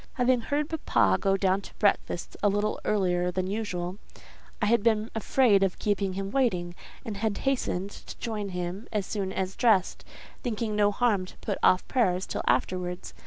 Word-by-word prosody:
Having 250 -1 +2
heard 290 +5 -1 0.2
papa 95 -2 +4
go 195 0 +2
down 190 0 +2
to - - -13
breakfast 200 -4 0
a 205 - +4
little 205 +1 0
earlier 180 -3 +1
than 185 +1 -1
usual, 190 -2 -3 0.6
I 230 - +1
had 230 +1 +3
been 220 0 +1
afraid 225 -2 +3
of 195 -2 +1
keeping 200 -2 0
him 195 +1 -4
waiting, 185 -10 +1 0.3
and 215 -3 -4
had 215 -1 -1
hastened 205 -8 -1
to - - -10
join 215 -4 -3
him 180 +3 -4
as 210 -3 -1
soon 195 -2 -3
as 190 0 -3
dressed, 220 -7 +2 0.4
thinking 225 -3 -2
no 205 -1 +4
harm 205 -4 +1
to - - -14
put 205 - -3
off 185 - +4
prayers 190 -8 +1
till - - -3
afterwards. 180 -1 -1
200 Hz, 175 wpm, -27 LUFS, 185-220 Hz, 0.6 s, papa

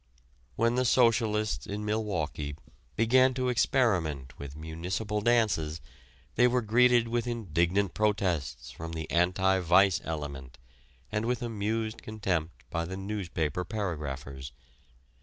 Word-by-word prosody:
When 115 +1 +2
the 125 +1 +2
socialists 110 - +2
in 105 +1 -4
Milwaukee 80 -10 -2 0.4
began 130 +3 +4
to 130 -1 0
experiment 90 - +1
with 70 -1 -7
municipal 90 +7 -3
dances 105 -9 +2 0.5
they 125 - +5
were 125 0 +1
greeted 120 +2 +4
with 120 +1 -1
indignant 95 -4 0
protests 90 - -1
from 80 +5 -7
the 80 -1 -4
"anti 90 +2 +3
vice" 90 +1 +4
element 70 -5 -6 0.5
and 105 +1 -1
with 125 -1 -1
amused 110 0 -2
contempt 90 -7 -3
by 85 0 -1
the 95 +2 -6
newspaper 90 -5 -2
paragraphers. 70 - -5
100 Hz, 120 wpm, -29 LUFS, 80-115 Hz, 0.5 s, they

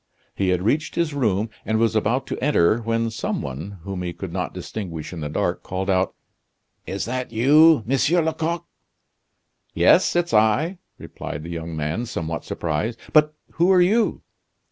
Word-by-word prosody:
He 95 -1 0
had 90 0 +1
reached 145 +9 0
his 165 -3 0
room, 110 -5 0
and 110 - 0
was 115 -1 +2
about 120 +5 +1
to - - -5
enter, 115 -7 +3
when 115 0 -1
some 110 - -3
one, 80 +10 -6
whom 95 -1 -5
he 90 -1 -3
could - - -7
not - - -2
distinguish 85 -7 -6
in 85 - -6
the 75 - -3
dark, - - -1
called 95 +2 -2
out: 95 0 +1 0.7
"Is 100 - -3
that 125 +1 -3
you, 145 +4 +5
Monsieur 145 +7 +2
Lecoq?" 160 +1 -2 1.1
"Yes, - - +4
it's 175 -6 0
I!" 110 - +3 0.2
replied 75 - -7
the 85 - -7
young 85 -1 -5
man, 80 +11 -2
somewhat 80 -6 -4
surprised; 85 +8 -2 0.2
"but 155 0 +4 0.2
who 175 +3 +4
are 185 - +6
you?" 215 +6 +2
110 Hz, 165 wpm, -23 LUFS, 90-150 Hz, 1.1 s, are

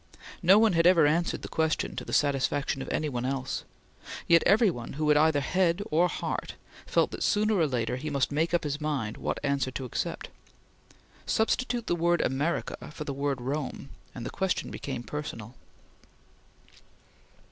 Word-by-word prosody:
No 185 +3 +7
one 220 -2 +4
ever 165 -1 +5
had 145 - +4
answered 170 +1 -1
the - - -5
question 160 -1 -1
to - - -4
the - - -8
satisfaction 140 -1 +1
of - - -6
any 155 - -1
one 125 -4 -3
else; 130 0 -3 0.6
yet 170 -1 +6
every 210 +1 +5
one 120 -7 -7
who 150 +2 -1
had 150 - +6
either 150 -1 +4
head 180 +5 +1
or 170 +4 +4
heart, - - -4 0.3
felt - - +2
that - - -7
sooner 215 0 +2
or 170 -6 +3
later 125 -2 -1
he 155 +4 -4
must 140 -2 0
make 160 +3 0
up 175 - +1
his 145 0 -3
mind 140 -8 -2
what - - -3
answer 140 -2 0
to 130 0 -5
accept. 125 - -4 1.0
Substitute 240 +1 0
the - - 0
word 170 0 +2
America 145 +6 -1
for 150 - -6
the 140 - -4
word 140 -1 -1
Rome, 135 +1 -4 0.3
and 120 - -6
the - - -4
question 190 -1 -1
became 130 -4 -5
personal. 120 -6 -6
150 Hz, 175 wpm, -28 LUFS, 135-170 Hz, 1.0 s, No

